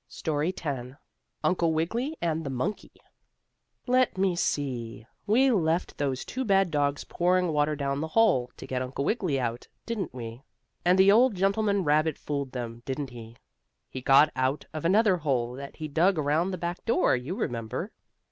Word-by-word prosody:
STORY 155 +2 -2
X 130 -4 -4 0.5
UNCLE 170 -3 +2
WIGGILY 235 - -1
AND 165 -1 0
THE 140 - -4
MONKEY 130 +10 -3 0.9
Let 255 -4 +2
me 190 -2 +2
see, 120 -9 -2 0.2
we 255 +6 +4
left 170 -5 0
those 135 -3 -1
two 260 - -3
bad 195 -5 +3
dogs 145 -1 0
pouring 180 0 +1
water 150 0 +1
down 140 0 -2
the 160 - -2
hole, 155 - +3
to - - -8
get 130 -1 -2
Uncle 130 +2 -3
Wiggily 180 - 0
out, 120 -1 -3 0.2
didn't 230 -4 -3
we? 115 -1 -8 0.4
And 180 +1 +4
the 190 +1 +7
old 235 +1 +5
gentleman 200 +1 +1
rabbit 155 0 +2
fooled 140 -3 -4
them, 120 -2 -6
didn't 135 0 -4
he? 115 -1 -11 0.5
He 130 - -6
got 135 +4 +5
out 130 +3 0
of 155 0 -5
another 200 +1 +4
hole 130 -7 -1
that 140 +2 -8
he 155 - -5
dug 170 +5 +2
around 155 +4 +1
by - - -3
the - - -3
back 175 +1 -4
door, 225 - +3
you 130 +9 -4
remember. 115 - -3
155 Hz, 175 wpm, -27 LUFS, 130-185 Hz, 0.9 s, the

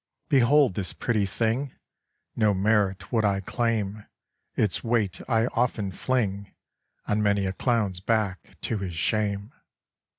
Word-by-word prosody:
"Behold 140 - +5
this 95 -1 -2
pretty 110 -4 0
thing, 115 +7 -1 0.6
No 105 -3 +3
merit 100 -1 +1
would 115 -3 +2
I 100 -2 +2
claim, 105 -1 -2 0.5
Its 105 -5 +1
weight 115 -5 0
I 115 -1 +3
often 115 -5 0
fling 100 -3 -1 0.6
On 105 +1 +1
many 100 -1 +2
a 95 - -1
clown's 105 -5 0
back, 105 -2 -1
to 110 - -1
his 90 -3 -4
shame. 100 - -1
105 Hz, 130 wpm, -26 LUFS, 100-115 Hz, 0.6 s, Behold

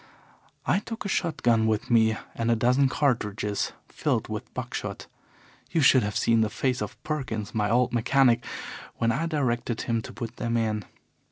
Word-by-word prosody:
I - - +3
took 225 +1 -7
a - - 0
shot 170 -4 -1
gun 115 -2 +4
with 110 +3 -1
me 110 -1 +4 0.2
and 115 0 -1
a 115 - +4
dozen 125 +4 +3
cartridges 105 -7 0 0.2
filled - - -1
with - - -5
buck - - -5
shot. - - -4 0.6
You 165 - +1
should 130 -2 +6
have 105 -1 -2
seen 115 -1 +3
the 110 - +2
face 130 +4 -1
of - - -5
Perkins, 130 -9 -3
my 105 -1 +1
old 120 +1 +2
mechanic, 120 0 +3 0.5
when 115 0 +1
I 155 +8 0
directed 120 -7 -1
him 115 -1 0
to - - -9
put 115 0 -7
them 115 0 0
in. 110 -3 -1
120 Hz, 180 wpm, -27 LUFS, 110-130 Hz, 0.6 s, should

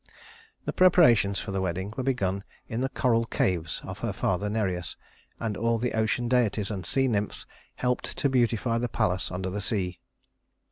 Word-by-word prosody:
The - - -2
preparations 125 - +5
for - - -4
the 95 0 -1
wedding 95 +3 -2
were - - -2
begun 100 -7 0 0.2
in 115 +2 -3
the 135 - 0
coral 115 -4 +2
caves 85 -6 -1
of - - -7
her - - -2
father 95 +3 -1
Nereus, 95 -5 -2 0.4
and 110 -3 -2
all 115 +2 +1
the 120 +2 -1
ocean 110 +2 +1
deities 115 -4 +1
and 95 -4 -4
sea 135 -1 +2
nymphs 105 -4 -1 0.3
helped 125 0 -1
to - - +2
beautify 120 -2 +1
the 120 0 -1
palace 95 -6 0
under 95 +1 -3
the 105 +2 -3
sea. 95 -4 -1
110 Hz, 175 wpm, -27 LUFS, 95-120 Hz, 0.4 s, preparations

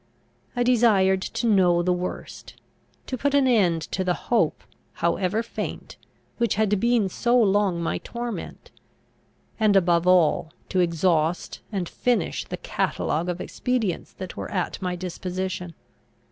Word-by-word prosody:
I 245 - +2
desired 215 -6 +4
to 235 - -3
know 180 -5 +4
the 180 +1 +2
worst; 180 +1 -6 0.5
to 255 - -4
put 285 +2 +1
an 280 -1 +4
end 185 -10 +3
to 190 - -1
the 180 -1 +1
hope, 220 -10 0 0.3
however 185 +6 0
faint, 230 - -6 0.4
which 235 -1 +1
had 210 -2 +2
been 235 -2 +2
so 240 +6 +2
long 200 -4 +2
my - - -1
torment; 235 -1 -6 0.9
and, 215 -2 +4
above 175 -2 +3
all, 170 -3 +3 0.2
to 185 - 0
exhaust 170 -1 +1
and 190 -4 -2
finish 240 -2 -1
the - - -5
catalogue 165 +4 -1
of 175 0 -3
expedients 230 -7 -2
that 185 -1 -8
were - - -5
at 185 -1 -2
my 180 -1 -2
disposition. 180 -1 -4
190 Hz, 140 wpm, -24 LUFS, 175-225 Hz, 0.9 s, desired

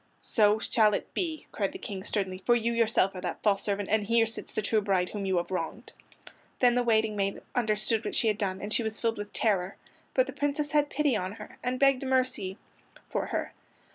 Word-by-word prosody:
"So 210 -2 +3
shall 215 -1 +3
it - - -5
be," 320 -4 -2
cried 200 -3 -1
the - - -5
King 190 -2 -6
sternly, 190 -3 -2
"for 240 - +4
you 235 0 0
yourself 220 -4 +2
are 185 - -7
that - - -4
false 200 -2 +3
servant, 200 -1 -2
and 215 0 +2
here 230 +2 +3
sits 225 - -5
the 215 - -2
true 215 +1 +2
bride 190 -3 +1
whom 200 -2 -4
you 190 -1 +1
have 175 +2 -2
wronged." 185 +6 -4 0.7
Then 245 -1 +5
the 245 - +2
waiting 220 -2 +2
maid 195 -1 -1
understood 220 -1 +1
what - - -3
she 230 - +2
had 210 -1 +1
done, 190 -2 -2
and 210 +1 -3
she - - +2
was 220 -1 -2
filled 230 -2 0
with 205 0 -6
terror. 195 -4 0 0.4
But - - +4
the - - -7
Princess 290 +1 -1
had 295 -1 +3
pity 295 -5 +1
on 185 -1 -2
her, - - -11
and 250 0 -1
begged 275 -2 +4
for 270 - -4
mercy 250 -7 0 0.5
for - - -1
her. - - -3
215 Hz, 230 wpm, -29 LUFS, 200-240 Hz, 0.7 s, Then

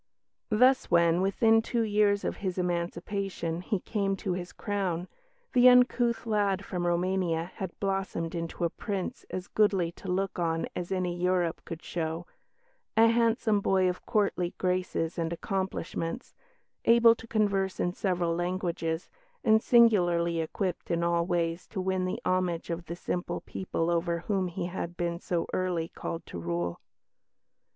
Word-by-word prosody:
Thus 255 +4 +4
when, 170 0 +4
within 225 +4 +4
two 230 +1 0
years 205 -1 +2
of - - -2
his 190 -2 -3
emancipation, 175 0 -2
he 190 +2 -1
came 195 0 -1
to 195 -2 -2
his 180 0 -5
crown, 190 -4 -2 0.5
the 250 -1 +8
uncouth 250 -1 +4
lad 205 -3 +1
from 175 -2 -2
Roumania 175 -1 0
had 190 -3 -6
blossomed 195 -4 -2
into 170 0 -4
a 170 - +1
Prince 195 -3 -4
as 185 0 -4
goodly 195 -5 +2
to 190 - -12
look 195 0 -1
on 165 -1 0
as 175 +1 -4
any 180 -2 -1
Europe 175 -1 0
could 165 0 -7
show 165 0 -3 0.7
a 225 +1 +7
handsome 230 -2 +2
boy 190 -1 +3
of 180 0 -2
courtly 195 -4 0
graces 180 -3 -1
and 165 0 -1
accomplishments, 190 +3 -3 0.5
able 230 0 +7
to 230 0 -12
converse 200 -4 0
in 175 - 0
several 180 -4 0
languages, 175 -1 -2 0.4
and 220 0 +5
singularly 175 -9 +4
equipped 175 +3 -3
in 170 0 0
all 170 0 +1
ways 170 -1 -1
to - - -5
win 185 0 0
the 185 - -2
homage 180 -2 0
of 170 +1 -4
the 170 - -5
simple 175 +1 -3
people 175 -3 -2
over 170 0 0
whom 190 0 0
he 175 0 -4
had 175 -1 -5
been 170 0 -2
so 175 -2 -1
early 175 -3 -1
called 165 - -6
to 85 - -7
rule. 85 +1 -2
180 Hz, 155 wpm, -29 LUFS, 170-200 Hz, 0.7 s, the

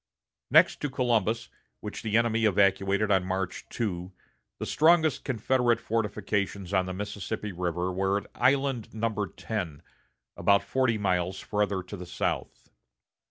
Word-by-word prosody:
Next - - +5
to 145 - -1
Columbus, 115 -3 0 0.3
which 105 - -6
the 110 -1 +1
enemy 115 -1 +2
evacuated 100 0 +3
on 95 -2 +4
March 95 0 -3
2, 90 -5 -3 0.5
the - - -4
strongest 160 -2 +3
Confederate 125 -1 +1
fortifications 100 -3 -2
on 95 -1 +2
the 95 - -3
Mississippi 105 +1 -4
River 90 0 -2
were 95 +2 +1
at 100 - -5
Island 130 -3 +1
No. 110 -2 -1
10, 90 -6 -5 0.5
about 100 0 +3
forty 130 -4 +1
miles 95 -2 0
farther 100 -2 -1
to 95 +3 -8
the 90 -2 -8
south. - - -3
105 Hz, 135 wpm, -28 LUFS, 95-115 Hz, 0.5 s, Next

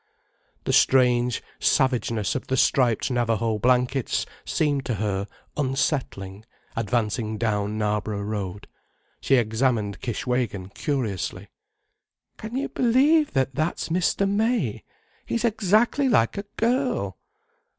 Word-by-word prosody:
The - - -1
strange 125 -2 +3 0.2
savageness 115 -5 +1
of 130 - -4
the 130 - 0
striped 125 -2 +2
Navajo 115 -2 0
blankets 125 +2 +1 0.2
seemed 145 -3 0
to 120 - 0
her 100 -1 -2 0.3
unsettling, 130 - -2 0.3
advancing 110 -1 -1
down 105 -1 -1
Knarborough 105 -1 -1
Road: 100 -2 -4 0.5
she 135 - +3
examined 110 -3 0
Kishwégin 120 -5 -2
curiously. 120 - -3 0.9
"Can 220 +3 -7
you 275 - -2
believe 280 +6 +3
that 135 0 +1
that's 155 +6 -2
Mr. 180 +3 +1
May—he's 220 - -2
exactly 225 +5 +2
like 115 - +3
a 200 - -4
girl. 250 +3 0
125 Hz, 105 wpm, -24 LUFS, 110-165 Hz, 0.9 s, strange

